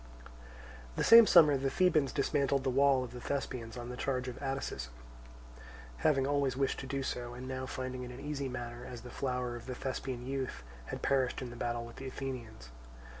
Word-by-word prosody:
The -, -, 0 dB
same 230 Hz, -1 st, +10 dB
summer 150 Hz, -5 st, +7 dB
the 135 Hz, 0 st, 0 dB
Thebans 155 Hz, -5 st, +3 dB
dismantled 140 Hz, -1 st, +1 dB
the 130 Hz, -, +1 dB
wall 135 Hz, 0 st, +4 dB
of 125 Hz, -, -7 dB
the 125 Hz, 0 st, -8 dB
Thespians 125 Hz, -4 st, -3 dB
on 120 Hz, 0 st, -6 dB
the 125 Hz, -, -5 dB
charge 130 Hz, 0 st, -1 dB
of 125 Hz, -, -6 dB
Atticism, 135 Hz, -, -3 dB, 1.1 s
having 135 Hz, -, +3 dB
always 140 Hz, -2 st, +1 dB
wished 135 Hz, -1 st, 0 dB
to 135 Hz, -, -6 dB
do 135 Hz, +1 st, -2 dB
so, 120 Hz, -1 st, -4 dB
and 125 Hz, +1 st, -7 dB
now 130 Hz, 0 st, -4 dB
finding 130 Hz, -1 st, -4 dB
it 125 Hz, -, -6 dB
an 125 Hz, +1 st, -9 dB
easy 140 Hz, -1 st, -3 dB
matter, 120 Hz, -1 st, -6 dB
as 120 Hz, -2 st, -8 dB
the 125 Hz, -, -10 dB
flower 125 Hz, -2 st, -2 dB
of 120 Hz, -, -9 dB
the 130 Hz, -, -4 dB
Thespian 130 Hz, -1 st, -4 dB
youth 130 Hz, -, -3 dB, 0.2 s
had -, -, -6 dB
perished 130 Hz, -1 st, +1 dB
in 125 Hz, -, -6 dB
the -, -, -9 dB
battle 120 Hz, 0 st, -2 dB
with 120 Hz, -, -12 dB
the 135 Hz, -, -6 dB
Athenians. 120 Hz, -, -6 dB
130 Hz, 200 wpm, -33 LUFS, 125-135 Hz, 1.1 s, same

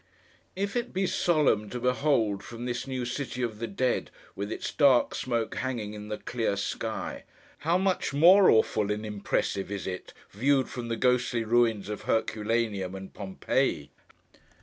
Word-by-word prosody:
If 200 Hz, +3 st, -2 dB
it 240 Hz, -, -2 dB
be 190 Hz, +1 st, +1 dB
solemn 150 Hz, -, +2 dB
to 125 Hz, -, -4 dB
behold 125 Hz, -5 st, +1 dB
from 120 Hz, +3 st, -8 dB
this 125 Hz, +1 st, -3 dB
new 130 Hz, -2 st, -3 dB
City 125 Hz, 0 st, -3 dB
of 110 Hz, -3 st, -3 dB
the 115 Hz, -, -3 dB
Dead, 125 Hz, +5 st, 0 dB, 0.3 s
with 100 Hz, +2 st, -4 dB
its -, -, -4 dB
dark 140 Hz, -5 st, +4 dB
smoke 120 Hz, -3 st, -2 dB
hanging 120 Hz, -5 st, -3 dB
in 105 Hz, 0 st, -8 dB
the 105 Hz, 0 st, -3 dB
clear 115 Hz, -5 st, -2 dB
sky, -, -, -4 dB, 0.4 s
how 165 Hz, +3 st, +2 dB
much 190 Hz, 0 st, 0 dB
more 180 Hz, +7 st, +7 dB
awful 110 Hz, -2 st, +3 dB
and 105 Hz, +1 st, -3 dB
impressive 100 Hz, -1 st, -2 dB
is 100 Hz, -2 st, -4 dB
it, 90 Hz, -1 st, -5 dB, 0.2 s
viewed 135 Hz, +5 st, +2 dB
from 120 Hz, -2 st, -5 dB
the 115 Hz, 0 st, -2 dB
ghostly 125 Hz, -1 st, +2 dB
ruins 115 Hz, -3 st, +2 dB
of 105 Hz, 0 st, -5 dB
Herculaneum 110 Hz, -3 st, 0 dB
and 95 Hz, 0 st, -9 dB
Pompeii! 95 Hz, -2 st, -1 dB
115 Hz, 160 wpm, -28 LUFS, 105-130 Hz, 0.4 s, more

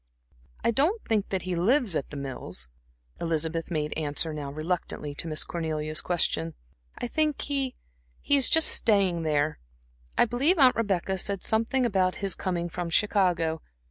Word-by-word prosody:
"I -, -, +3 dB
don't 310 Hz, -, +2 dB
think 215 Hz, -3 st, 0 dB
he 185 Hz, -1 st, -2 dB
lives 210 Hz, -, +2 dB
at 140 Hz, -, -2 dB
The 145 Hz, -, -7 dB
Mills," 130 Hz, -, -3 dB, 0.5 s
Elizabeth 165 Hz, 0 st, -1 dB
made 150 Hz, -3 st, -2 dB
answer 155 Hz, +1 st, -1 dB
now 145 Hz, -2 st, -5 dB
reluctantly 155 Hz, -1 st, -3 dB
to 155 Hz, -, -4 dB
Miss 155 Hz, -1 st, +1 dB
Cornelia's 155 Hz, -2 st, -2 dB
question. 85 Hz, -, 0 dB, 0.4 s
"I -, -, -3 dB
think 305 Hz, +3 st, 0 dB
he 275 Hz, -3 st, -1 dB, 0.4 s
he 285 Hz, -, +2 dB
is 275 Hz, -2 st, +5 dB
just 320 Hz, 0 st, +6 dB
staying 195 Hz, -6 st, +3 dB
there 155 Hz, -1 st, 0 dB, 0.6 s
I -, -, +6 dB
believe 270 Hz, +10 st, +2 dB
Aunt 260 Hz, -4 st, +6 dB
Rebecca 190 Hz, -3 st, 0 dB
said 200 Hz, 0 st, -1 dB
something 230 Hz, +4 st, +1 dB
about 190 Hz, -5 st, +1 dB
his 195 Hz, -2 st, -1 dB
coming 175 Hz, -2 st, -2 dB
from 175 Hz, 0 st, -4 dB
Chicago. 175 Hz, -5 st, +1 dB
180 Hz, 155 wpm, -27 LUFS, 155-230 Hz, 0.6 s, just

